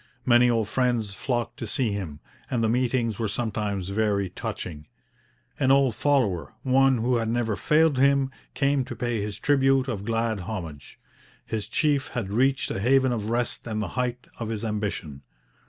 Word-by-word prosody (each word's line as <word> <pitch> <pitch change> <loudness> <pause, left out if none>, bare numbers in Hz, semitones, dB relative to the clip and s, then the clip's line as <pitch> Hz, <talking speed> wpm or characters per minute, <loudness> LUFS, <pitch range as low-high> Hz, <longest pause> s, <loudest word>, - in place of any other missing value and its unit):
Many 120 0 +5
old 115 -3 +1
friends 120 -4 0
flocked 120 +3 -2
to 115 - -5
see 115 +2 0
him; 90 -8 -5 0.3
and 120 -2 0
the 110 - +2
meetings 120 -2 0
were 115 - 0
sometimes 100 -3 -2
very 100 -2 0
touching. 75 -4 -6 0.7
An 130 - +2
old 135 -2 +4
follower, 110 - 0
one 135 0 +4
who 120 +2 +1
had 115 -1 -1
never 115 -2 0
failed 155 0 +3
him, 140 0 +3 0.2
came 140 0 +2
to - - -7
pay 120 -3 -1
his 105 -1 -4
tribute 135 0 +3
of 105 -6 -3
glad 115 -1 0
homage. 85 -7 -7 0.5
His 110 -2 -3
chief 145 +3 +1
had 105 -6 -4
reached 135 +4 +2
a - - -2
haven 130 +4 +3
of 110 -3 -2
rest 120 +1 -1
and 110 -2 -2
the 105 - -2
height 125 -1 -2
of 115 -2 -3
his 115 0 -3
ambition. 100 -10 -3
115 Hz, 170 wpm, -26 LUFS, 105-130 Hz, 0.7 s, Many